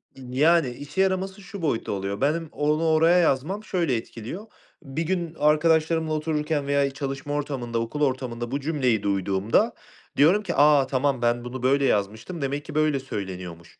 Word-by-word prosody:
Iıı, 130 -1 -9
yani, 160 0 +4
işe 145 +8 -3
yaraması 190 +1 -1
şu 195 +1 -9
boyutta 145 -8 -1
oluyor. 100 +2 -3
Benim 155 +3 0
onu 150 +2 0
oraya 165 +3 +4
yazmam 170 +6 +1
şöyle 170 - 0
etkiliyor. 120 - -7 0.4
Bir 140 +4 -4
gün 170 -2 -2
arkadaşlarımla 160 +1 +2
otururken 150 -2 -1
veya 140 -1 +2
çalışma 135 +1 -4
ortamında, 130 -5 -2
okul 115 +6 -4
ortamında 125 -3 -1
bu 140 - -1
cümleyi 130 -8 0
duyduğumda 100 +1 +1 0.4
diyorum 180 +9 +5
ki; 175 -3 -3
"A, 145 -2 +5
tamam. 135 -1 0
Ben 120 0 +1
bunu 125 0 -6
böyle 140 +1 +3
yazmıştım 110 - -1
demek 140 +1 -2
ki - - -9
böyle 155 -2 +2
söyleniyormuş." 90 -8 -7
140 Hz, 160 wpm, -25 LUFS, 120-160 Hz, 0.4 s, diyorum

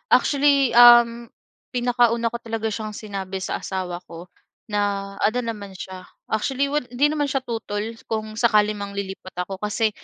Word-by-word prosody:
Actually, 280 -2 +4
um, 240 -1 +7 0.4
pinakauna 240 -2 +2
ko - - -2
talaga 225 -1 -3
siyang 215 0 -3
sinabi 195 -3 -5
sa 190 - -4
asawa 180 -2 -4
ko. 170 +1 -9 0.4
Naano 205 +2 -1
naman 210 -4 -6
siya, 185 0 -9 0.2
actually 270 +6 0
wad 295 -3 -1
hindi 290 +4 +3
naman 300 -1 0
siya 270 -1 -1
tutol 225 -4 -4 0.2
kung 215 -1 -4
sakali 215 -3 +4
mang 200 -1 -5
lilipat 190 -1 -6
ako 190 +1 -7
kasi, 210 +2 0
220 Hz, 150 wpm, -23 LUFS, 200-240 Hz, 0.4 s, um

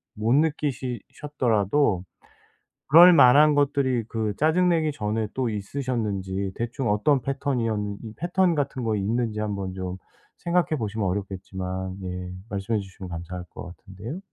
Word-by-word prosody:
못 110 +3 +1
느끼시 140 -6 0 0.2
셨더라도 115 -6 +1 0.8
그럴 175 +4 +9
만한 150 +2 +7
것들이 140 -4 +1
그 110 -2 -2
짜증 170 +4 +3
내기 160 -3 +2
전에 110 -3 -2
또 130 -3 0
있으셨는지 100 -4 -3
대충 120 +1 -2
어떤 130 +6 +2
패턴이었 130 -5 -1 0.3
이 110 -1 -8
패턴 175 +1 +1
같은 140 -3 -2
거 110 -2 0
있는지 110 +2 -1
한번 100 -3 -3
좀 95 0 -5 0.4
생각해 170 -3 0
보시면 105 -2 -2
어렵겠지만 95 -1 -4
예 90 0 -5 0.2
말씀해 105 +2 -1
주시면 95 -1 -9
감사할 90 +1 -6
것 90 - -9
같은데요. 110 - -8
115 Hz, 310 characters per minute, -25 LUFS, 95-140 Hz, 0.8 s, 그럴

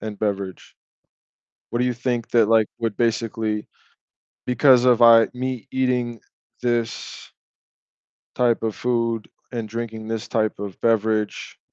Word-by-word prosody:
and 105 -2 -6
beverage. 100 -3 -4 0.9
What 120 - -2
do 125 - +2
you 125 - 0
think 120 -1 -2
that, 115 -3 +4
like, 110 -1 +4
would 115 -3 -2
basically 110 -2 -1 0.8
because 125 0 +5
of 125 -2 +4
I 115 -1 +8
me 125 -3 -4
eating 125 -3 -1 0.4
this 120 -2 -3 1.0
type 120 -2 +2
of 110 -2 -1
food 115 -2 -1 0.2
and 115 -3 -4
drinking 110 0 -6
this 115 0 -4
type 110 -3 -1
of 100 -2 -7
beverage 110 -2 0
115 Hz, 130 wpm, -22 LUFS, 110-120 Hz, 1.0 s, I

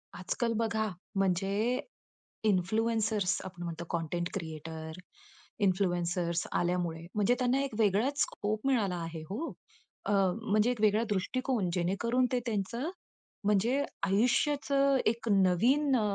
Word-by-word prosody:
आजकाल 230 +6 -1
बघा, 220 -1 0 0.3
म्हणजे 195 +5 +1 0.7
इन्फ्लुएन्सर्स 215 +1 +1
आपण 180 -2 -7
म्हणतो 170 0 -5
कंटेंट 170 +1 -2
क्रिएटर, 160 -1 -6 0.7
इन्फ्लुएन्सर्स 175 -2 0
आल्यामुळे 175 -2 -1
म्हणजे 210 +4 +3
त्यांना 255 +2 +2
एक 275 - -3
वेगळाच 225 +7 +2
स्कोप 215 +2 -1
मिळाला 215 -9 +2
आहे 165 -1 -6
हो. 250 +12 -3 0.5
अ, - - 0 0.3
म्हणजे 215 +1 +2
एक 240 -4 -4
वेगळा 215 +1 +4
दृष्टिकोन 210 +1 0
जेणेकरून 200 +9 +1
ते 250 - +3
त्यांचं 230 - -2 0.6
म्हणजे 225 +7 +2 0.2
आयुष्याचं 275 +6 +2
एक 230 +1 0
नवीन 235 - +3
अ, - - +1
205 Hz, 115 wpm, -31 LUFS, 180-240 Hz, 0.7 s, वेगळा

